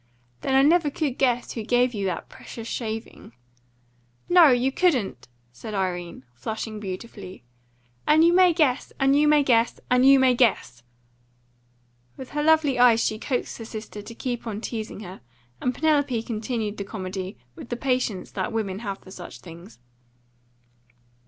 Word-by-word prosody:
"Then 265 - 0
I 270 - +6
never 320 +1 +4
could 285 -3 -3
guess 245 -2 +1
who 230 - -4
gave 245 +2 +2
you 200 -3 -2
that 180 - -4
precious 230 -1 -10
shaving." 225 - -6 0.9
"No, 350 -2 +7
you 255 0 +3
couldn't!" 270 - 0 0.2
said 205 - -8
Irene, 175 -6 -3
flushing 215 - -5
beautifully. 190 - -8 0.6
"And 315 +1 +5
you 340 +1 +5
may 365 0 +6
guess, 300 -6 +1
and 270 0 +4
you 300 +1 +4
may 300 -1 +5
guess, 235 -3 +2
and 250 0 +4
you 275 +1 +7
may 260 -1 +4
guess!" 230 - +1 1.4
With 260 - -9
her 295 - -1
lovely 300 -4 +3
eyes 235 -2 +5
she 215 - -1
coaxed 250 0 -3
her 225 - -7
sister 215 -1 -8
to 230 +3 -11
keep 240 -1 -4
on 210 -2 -4
teasing 220 -2 -5
her, 190 -2 -10 0.4
and 250 - +1
Penelope 285 -5 +1
continued 220 -2 -3
the 200 - -3
comedy 190 -1 -6 0.2
with 235 - -11
the 240 - -3
patience 250 -7 -1
that 185 - -3
women 205 -4 -3
have 200 -4 -4
for 185 - -16
such 180 -2 -10
things. 165 -8 -13
235 Hz, 160 wpm, -24 LUFS, 205-270 Hz, 1.4 s, No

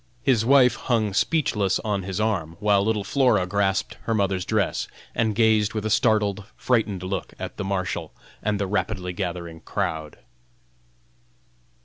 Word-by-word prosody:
His 125 -5 +3
wife 130 0 +5
hung 110 -5 0
speechless 105 - +1
on 105 -2 -1
his 95 +1 -4
arm, 90 -7 -1
while 100 -1 +3
little 105 -1 0
Flora 115 -3 +2
grasped 100 0 -1
her 115 - 0
mother's 95 -3 0
dress, - - 0 0.3
and 110 -2 0
gazed 110 -1 +3
with 110 -1 -2
a 110 - -1
startled, 105 -2 +2
frightened 110 -7 0
look 95 +1 -4
at - - -6
the - - -3
Marshal 95 -4 -2 0.3
and 105 -1 -1
the 100 - 0
rapidly 95 -2 -2
gathering 85 -3 -4
crowd. 80 -1 -3
100 Hz, 145 wpm, -24 LUFS, 95-110 Hz, 0.3 s, wife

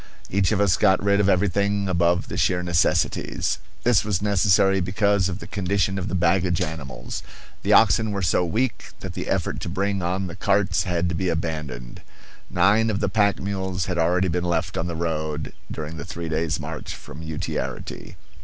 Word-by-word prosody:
Each 100 +1 +2
of 105 - +1
us 100 -4 +3
got 95 - +4
rid 100 0 +3
of 100 -1 +3
everything 100 +1 +1
above 85 -1 +2
the - - -5
sheer 90 -1 +1
necessities. 85 -2 +1 0.2
This 120 -1 +4
was 100 -4 0
necessary 95 -1 +3
because 100 0 +2
of 90 - -3
the - - -9
condition 100 0 0
of 90 - -3
the 90 - -2
baggage 90 0 +2
animals. 70 -6 -5 0.4
The - - +2
oxen 110 -1 +5
were 100 -1 -2
so 90 +1 +2
weak 110 +8 -2
that - - -6
the - - -5
effort - - -1
to - - -4
bring 100 +2 -1
on 90 +2 -1
the 90 -1 -6
carts 100 -1 +1
had 90 -1 0
to - - -2
be 90 +2 -1
abandoned. 75 -7 -4 0.5
Nine 110 +3 +3
of 100 -2 -1
the 100 - 0
pack 100 0 +2
mules 95 -2 -2
had 90 -2 -2
already 90 +3 +2
been 90 0 -1
left 85 0 -1
on 85 - -1
the 85 - -4
road 80 -2 -3 0.2
during 80 +1 -5
the 75 - -5
three 85 -1 -5
days' 80 -1 -1
march 80 0 -6
from 75 - -10
Utiarity. 80 0 -5
90 Hz, 190 wpm, -24 LUFS, 85-100 Hz, 0.5 s, oxen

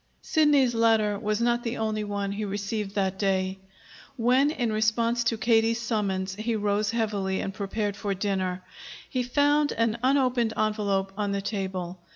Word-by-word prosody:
Sidney's 295 -7 +3
letter 220 -3 +2
was 215 0 -1
not 240 0 +1
the 235 0 -3
only 215 -1 -1
one 200 -1 -3
he 205 +2 -3
received 200 0 -3
that 190 -1 0
day. 190 -1 0 0.6
When, 255 +4 +3
in 240 -7 -1
response 230 +2 +1
to 230 -1 +1
Katie's 225 0 +2
summons, 200 -5 -1
he 220 +3 -2
rose 205 0 0
heavily 205 -4 -1
and 195 - -3
prepared 205 0 -2
for 200 -1 -3
dinner, 185 -2 -2 0.4
he 255 - -1
found 290 +3 +2
an 230 0 0
unopened 255 -3 +2
envelope 200 -3 0
on 205 -1 -1
the 200 - -1
table. 190 -3 -4
215 Hz, 160 wpm, -26 LUFS, 200-235 Hz, 0.6 s, Sidney's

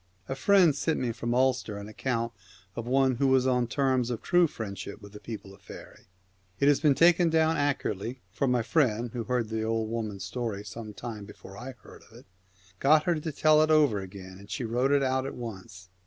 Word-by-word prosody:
A - - -2
friend 180 +6 +5
has 145 -1 -2
sent 160 - 0
me 125 -2 -1
from 120 +1 -3
Ulster 130 -5 +1
an 100 0 -8
account 115 +1 -2 0.4
of 115 0 -5
one 130 -1 +2
who 140 +2 +2
was 130 -1 +3
on 125 -2 +2
terms 130 -2 +1
of 120 -3 -4
true 175 -1 +4
friendship 100 -6 -7
with 100 0 -13
the 105 - -9
people 105 -4 -8
of 100 - -18
faery. - - -13 0.5
It 140 - +3
has 145 -1 +4
been 145 -3 +3
taken 170 +1 +5
down 160 0 +3
accurately, 130 - -2
for 140 - -1
my 125 -2 +2
friend, 120 -4 +1
who 120 - -4
had 115 - -4
heard 120 -3 0
the 110 0 -2
old 110 0 -1
woman's 110 -4 -4
story 105 0 -4
some 105 +1 -8
time 110 -4 -7
before 95 -1 -13
I 125 +5 -8
heard - - -14
of 115 - -15
it, 125 - -16 0.5
got 150 +2 +5
her 175 - +2
to 155 +1 -4
tell 155 +1 +4
it 155 - +2
over 150 -9 +4
again, 95 -1 -10
and 105 +4 -5
wrote 125 +3 +1
it 140 -1 +3
out 130 0 0
at - - -6
once. 100 -5 -9
120 Hz, 220 wpm, -28 LUFS, 110-140 Hz, 0.5 s, friend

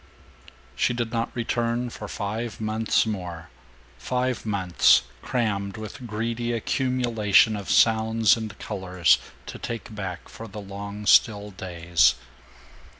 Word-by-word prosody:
She 120 - +1
did 120 -1 -2
not 115 0 0
return 120 0 -1
for 105 - -7
five 105 +3 -4
months 110 +1 +1
more; 90 -6 -5 0.5
five 125 - -2
months 95 - +4 0.2
crammed 100 -5 -1
with 110 +4 -8
greedy 115 +2 -2
accumulation 115 -3 +2
of 100 -2 -6
sounds 110 -2 +4
and 110 -4 -6
colors 90 -4 +1 0.3
to - - -8
take 115 0 -6
back 95 -4 -6
for 115 - -10
the 105 0 -8
long 100 +1 -7
still 105 -1 +4
days. 85 -2 +2
110 Hz, 120 wpm, -25 LUFS, 100-115 Hz, 0.5 s, months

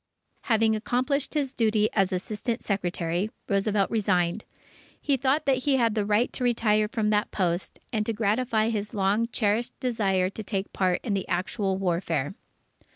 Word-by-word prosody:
Having 225 -1 +3
accomplished 255 +7 -1
his 280 -3 0
duty 215 -3 +2
as 195 -2 +2
Assistant 215 +5 -3
Secretary, 180 -1 -1 0.2
Roosevelt 200 0 +1
resigned. 185 -3 +1 0.5
He 285 - +1
thought 270 +3 +1
that 270 -1 +3
he 270 +2 +1
had 230 -4 +2
a 210 - +1
right 210 +4 +1
to 255 - -3
retire 215 -3 +2
from 215 -1 0
that 210 0 +1
post, 175 -2 -2
and 215 -2 +1
to - - +1
gratify 220 +1 +1
his 210 -2 -3
long 205 +3 +2
cherished 230 +1 -1
desire 195 -7 +1
to 220 - -6
take 195 -1 -3
part 185 -2 +1
in 215 - -1
the 195 -1 -2
actual 190 +2 -1
warfare. 170 -5 -1
210 Hz, 160 wpm, -26 LUFS, 195-230 Hz, 0.5 s, Having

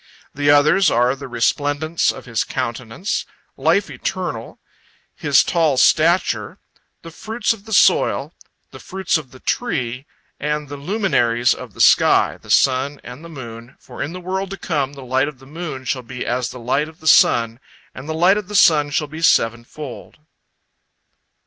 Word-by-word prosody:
The 145 +1 0
others 150 +5 +5
are 125 +3 +2
the 140 - -9
resplendence 145 +6 0
of - - -11
his 115 -3 -1
countenance; 120 - -4 0.3
life - - +1
eternal; - - -5 0.6
his - - +3
tall 160 -6 +1
stature; 170 +7 +2 0.5
the 165 - -10
fruits 225 +7 -2
of 210 -2 -15
the 220 - -11
soil; 200 - +3 0.4
the - - -11
fruits 190 -3 -1
of 140 -5 -12
the 130 - -15
tree; 130 - -3 0.3
and 150 0 -3
the 145 - -6
luminaries 140 - +1
of 125 -6 -10
the - - -4
sky, - - +4
the - - -17
sun 135 +2 +2
and 125 +6 -10
the 170 - -10
moon, 120 -4 -10
for - - -11
in 145 - -3
the 180 - -7
world 190 +2 -3
to 195 - -6
come 145 -6 -2
the 135 -2 -10
light 130 +2 +1
of 150 -3 -8
the 135 - -17
moon 150 -3 -7
shall 130 0 -2
be 125 +1 -7
as 125 0 -1
the 125 - -9
light 135 +6 -1
of 160 +2 -18
the 160 - -16
sun, 115 -6 +4 0.3
and 135 +4 -10
the 160 - -2
light 180 +5 +4
of 210 -3 -5
the 210 - -7
sun 150 -6 +5
shall 145 +2 -1
be 155 +2 -9
sevenfold. 120 0 -1
145 Hz, 175 wpm, -20 LUFS, 125-165 Hz, 0.6 s, others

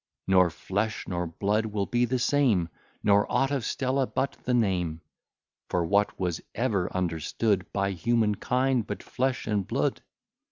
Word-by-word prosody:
Nor 90 -2 +5
flesh 100 +6 -3
nor 90 -1 -2
blood 105 +6 0
will 105 -2 -1
be 120 +2 +1
the 130 +2 0
same 120 - +2 0.3
Nor 100 0 +3
aught 135 +1 +2
of 140 -4 0
Stella 130 +1 0
but 135 +1 -1
the 125 - +1
name: 90 -8 0 0.7
For 85 -2 +1
what 100 +3 +1
was 90 -3 -1
ever 105 -7 0
understood, 90 +3 -1
By 100 0 0
human 110 +4 +1
kind, 125 +2 0
but - - -5
flesh 130 0 -1
and 105 -4 -1
blood? - - 0
105 Hz, 155 wpm, -27 LUFS, 90-125 Hz, 0.7 s, Nor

